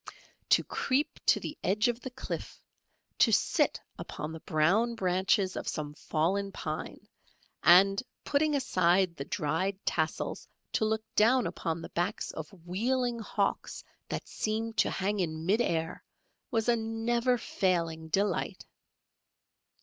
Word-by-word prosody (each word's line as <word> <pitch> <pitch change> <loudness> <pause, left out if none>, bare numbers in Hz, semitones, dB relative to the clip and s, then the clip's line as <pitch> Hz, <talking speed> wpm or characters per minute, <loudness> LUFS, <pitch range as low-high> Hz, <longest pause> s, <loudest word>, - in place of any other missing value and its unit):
To - - +5
creep 280 +3 -1
to - - +5
the 300 - -6
edge 210 +4 +2
of 240 -1 -1
the 260 - -5
cliff, 260 +1 -6 0.6
to - - +6
sit - - +2 0.2
upon 150 - -5
the 160 - -7
brown 190 +11 +2
branches 185 0 +1
of - - -5
some 150 -1 -3
fallen 190 +7 -1
pine, 155 -4 -5 0.5
and 195 - +6 0.2
putting 295 +1 +2
aside 185 -8 +2
the 140 - -5
dried 180 +5 -1
tassels 160 -2 -1 0.3
to 220 - +2
look 220 0 0
down 240 +4 +4
upon 165 -1 -3
the - - -7
backs 175 +5 -2
of 160 -1 -7 0.2
wheeling 240 +6 0
hawks 205 -2 -2 0.3
that - - -4
seemed 220 +1 -2
to - - +4
hang 200 +2 -1
in 160 -3 -2
mid 210 +6 +3
air 165 -5 -1 0.5
was 225 0 0
a 240 - +5
never 235 +2 0
failing 165 -7 -1
delight. 195 +1 -1
195 Hz, 135 wpm, -30 LUFS, 170-230 Hz, 0.6 s, to